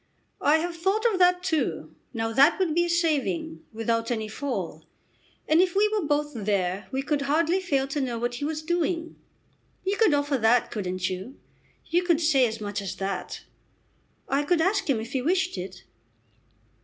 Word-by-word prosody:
"I 295 Hz, -, +4 dB
have 340 Hz, +2 st, -3 dB
thought 385 Hz, +7 st, 0 dB
of 370 Hz, -, -1 dB
that 360 Hz, 0 st, +4 dB
too. 325 Hz, -5 st, -1 dB, 0.2 s
Now 225 Hz, -1 st, -2 dB
that 280 Hz, +7 st, +5 dB
would 365 Hz, -5 st, +1 dB
be 345 Hz, +2 st, +2 dB
a -, -, -3 dB
saving, 285 Hz, -, 0 dB
without 230 Hz, +1 st, -1 dB
any 220 Hz, -3 st, -2 dB
fall. 265 Hz, +5 st, -4 dB, 0.6 s
And 315 Hz, +3 st, +5 dB
if 365 Hz, -1 st, +1 dB
we 415 Hz, +2 st, +4 dB
were 425 Hz, -1 st, 0 dB
both 295 Hz, 0 st, 0 dB
there 200 Hz, -4 st, -1 dB
we 265 Hz, 0 st, -1 dB
could 290 Hz, 0 st, 0 dB
hardly 320 Hz, +6 st, +2 dB
fail 280 Hz, -8 st, 0 dB
to 285 Hz, +1 st, -1 dB
know 245 Hz, -3 st, -2 dB
what 240 Hz, +1 st, -2 dB
he 245 Hz, -, -5 dB
was 310 Hz, 0 st, -3 dB
doing. 335 Hz, 0 st, -1 dB, 0.7 s
You 395 Hz, +2 st, 0 dB
could 430 Hz, -10 st, +4 dB
offer 285 Hz, -2 st, 0 dB
that, 230 Hz, +2 st, +3 dB
couldn't 185 Hz, -3 st, -2 dB
you? 190 Hz, +9 st, -6 dB, 0.5 s
You 345 Hz, +2 st, +1 dB
could 345 Hz, -3 st, +2 dB
say 290 Hz, -6 st, +4 dB
as 220 Hz, 0 st, -5 dB
much 205 Hz, -1 st, -4 dB
as 195 Hz, -2 st, -5 dB
that?" 195 Hz, -1 st, -4 dB, 0.9 s
"I 275 Hz, +1 st, +1 dB
could 335 Hz, +3 st, +1 dB
ask 375 Hz, +1 st, +1 dB
him 255 Hz, -5 st, +2 dB
if 225 Hz, +3 st, -7 dB
he 265 Hz, -, 0 dB
wished 365 Hz, +6 st, +1 dB
it." 185 Hz, 0 st, -7 dB
285 Hz, 185 wpm, -26 LUFS, 225-340 Hz, 0.9 s, that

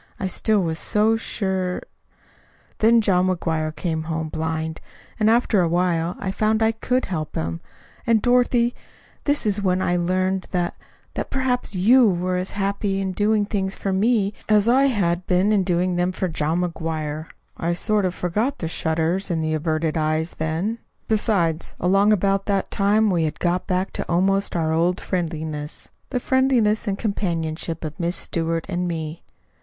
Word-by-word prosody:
I 195 Hz, -, -2 dB
still 205 Hz, +2 st, +1 dB
was 160 Hz, -1 st, -2 dB
so 215 Hz, +2 st, +2 dB
sure 190 Hz, -4 st, -2 dB, 1.0 s
"Then 230 Hz, +1 st, +5 dB
John 185 Hz, -3 st, +2 dB
McGuire 160 Hz, -4 st, -1 dB
came 160 Hz, 0 st, -2 dB
home 160 Hz, -1 st, -3 dB
blind; 160 Hz, 0 st, -3 dB, 0.4 s
and 215 Hz, 0 st, +4 dB
after 225 Hz, -3 st, +3 dB
a 175 Hz, -, +2 dB
while 175 Hz, 0 st, 0 dB
I 190 Hz, -, -3 dB
found 215 Hz, +2 st, +1 dB
I 220 Hz, -, +4 dB
could 250 Hz, +3 st, -1 dB
help 155 Hz, -5 st, -4 dB
him. 80 Hz, +1 st, -3 dB, 0.5 s
And, 230 Hz, -1 st, +4 dB
Dorothy, 245 Hz, 0 st, +3 dB, 0.5 s
then 290 Hz, -, +3 dB
is 205 Hz, -1 st, +1 dB
when 185 Hz, -2 st, +1 dB
I 180 Hz, -1 st, +1 dB
learned 185 Hz, +2 st, 0 dB
that 175 Hz, -2 st, -1 dB, 0.4 s
that -, -, -4 dB
perhaps 255 Hz, -5 st, -1 dB
YOU 230 Hz, +6 st, +5 dB
were 180 Hz, 0 st, 0 dB
as 185 Hz, +1 st, -2 dB
happy 200 Hz, 0 st, -1 dB
in 190 Hz, -1 st, -1 dB
doing 210 Hz, +2 st, +2 dB
things 195 Hz, -2 st, -2 dB
for 195 Hz, -, -2 dB
me 205 Hz, 0 st, +2 dB, 0.2 s
as 210 Hz, 0 st, +4 dB
I 260 Hz, +3 st, +5 dB
had 185 Hz, -8 st, 0 dB
been 185 Hz, +3 st, +3 dB
in 205 Hz, -3 st, +3 dB
doing 180 Hz, 0 st, 0 dB
them 180 Hz, +1 st, +1 dB
for 185 Hz, 0 st, -2 dB
John 160 Hz, +1 st, 0 dB
McGuire. 160 Hz, -3 st, -3 dB, 0.3 s
I 170 Hz, +1 st, -1 dB
sort 210 Hz, +3 st, +1 dB
of 180 Hz, -1 st, -1 dB
forgot 215 Hz, +11 st, -1 dB
the 165 Hz, -, -3 dB
shudders 165 Hz, +4 st, -1 dB
and 165 Hz, -2 st, 0 dB
the 155 Hz, 0 st, 0 dB
averted 155 Hz, 0 st, -1 dB
eyes 155 Hz, +1 st, 0 dB
then. 165 Hz, +9 st, -1 dB, 0.3 s
Besides, 195 Hz, -7 st, 0 dB
along 195 Hz, +4 st, +3 dB
about 195 Hz, -1 st, +1 dB
that 195 Hz, -2 st, 0 dB
time 210 Hz, +1 st, +3 dB
we 170 Hz, -3 st, +2 dB
had 155 Hz, -, -4 dB
got 180 Hz, +1 st, 0 dB
back 185 Hz, +1 st, -1 dB
to -, -, -4 dB
almost 195 Hz, +3 st, +1 dB
our 160 Hz, -2 st, +1 dB
old 175 Hz, +3 st, +1 dB
friendliness 160 Hz, -4 st, -4 dB, 0.2 s
the 250 Hz, -, -1 dB
friendliness 245 Hz, -5 st, +2 dB
and 195 Hz, -1 st, 0 dB
companionship 165 Hz, -6 st, -2 dB
of 155 Hz, -1 st, -6 dB
Miss 170 Hz, +1 st, 0 dB
Stewart 165 Hz, 0 st, -1 dB
and 180 Hz, -1 st, -2 dB
me. 160 Hz, -1 st, -4 dB
185 Hz, 170 wpm, -23 LUFS, 165-210 Hz, 1.0 s, Then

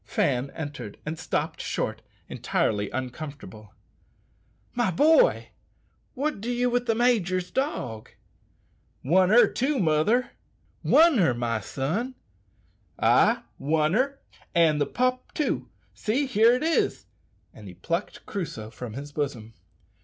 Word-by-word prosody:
Fan 125 Hz, +5 st, 0 dB
entered 145 Hz, -9 st, -6 dB
and 160 Hz, +2 st, -4 dB
stopped -, -, -2 dB
short, -, -, -3 dB, 0.3 s
evidently 105 Hz, -2 st, -1 dB
uncomfortable. 130 Hz, -5 st, -7 dB, 1.0 s
"My 240 Hz, -4 st, +1 dB
boy, 315 Hz, -, +4 dB, 0.7 s
what 285 Hz, -6 st, -2 dB
do 230 Hz, -, -4 dB
ye 245 Hz, 0 st, 0 dB
with 245 Hz, 0 st, 0 dB
the 225 Hz, -, +2 dB
major's 195 Hz, -7 st, +1 dB
dog?" 125 Hz, -, -3 dB, 0.9 s
"Won 185 Hz, +6 st, +4 dB
her 240 Hz, +4 st, +7 dB
too, 275 Hz, +3 st, -1 dB
mother!" 190 Hz, +7 st, +2 dB, 0.5 s
"Won 325 Hz, -6 st, +5 dB
her, 160 Hz, -10 st, +3 dB
my 115 Hz, -2 st, -1 dB
son?" 170 Hz, -, -3 dB, 0.8 s
"Ay, -, -, +3 dB, 0.2 s
won 155 Hz, +2 st, +1 dB
her, 275 Hz, +5 st, 0 dB, 0.4 s
and 160 Hz, -3 st, +4 dB
the 145 Hz, -, +1 dB
pup 255 Hz, 0 st, -1 dB
too; 300 Hz, -, -1 dB, 0.2 s
see, 255 Hz, +7 st, -1 dB
here 235 Hz, -2 st, +4 dB
it 255 Hz, -, -2 dB
is!" 325 Hz, +1 st, 0 dB, 0.5 s
and -, -, -12 dB
he -, -, -10 dB
plucked -, -, -4 dB
Crusoe 125 Hz, -, -5 dB
from 120 Hz, -2 st, -8 dB
his 145 Hz, +4 st, -7 dB
bosom. 135 Hz, -7 st, -4 dB
175 Hz, 125 wpm, -26 LUFS, -, 1.0 s, her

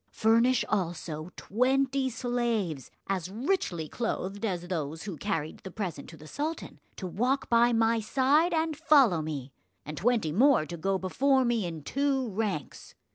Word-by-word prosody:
Furnish 230 Hz, +3 st, +3 dB
also 170 Hz, -4 st, -3 dB
twenty 265 Hz, +4 st, +1 dB
slaves, 230 Hz, -, -2 dB, 0.2 s
as 185 Hz, -3 st, -2 dB
richly 210 Hz, -, -1 dB
clothed 205 Hz, -1 st, -3 dB
as 180 Hz, -5 st, -2 dB
those 160 Hz, -3 st, -3 dB
who 195 Hz, -4 st, -5 dB
carried 160 Hz, -4 st, -3 dB
the 190 Hz, -, -9 dB
present 180 Hz, -7 st, -5 dB
to 160 Hz, -, -12 dB
the 155 Hz, -, -13 dB
sultan, 305 Hz, -, -5 dB, 0.2 s
to 190 Hz, -, -6 dB
walk 245 Hz, +11 st, -1 dB
by 235 Hz, +1 st, +5 dB
my 225 Hz, 0 st, +3 dB
side 275 Hz, +9 st, +2 dB
and 320 Hz, -1 st, 0 dB
follow 275 Hz, -, +4 dB
me, 145 Hz, -4 st, -5 dB, 0.3 s
and 155 Hz, 0 st, -7 dB
twenty 220 Hz, -6 st, +1 dB
more 245 Hz, -, +4 dB
to 170 Hz, -, -6 dB
go 190 Hz, +4 st, 0 dB
before 260 Hz, +8 st, +2 dB
me 230 Hz, -6 st, +1 dB
in 160 Hz, -3 st, -7 dB
two 270 Hz, -, 0 dB
ranks. 195 Hz, -8 st, -4 dB
215 Hz, 155 wpm, -28 LUFS, 170-255 Hz, 0.3 s, by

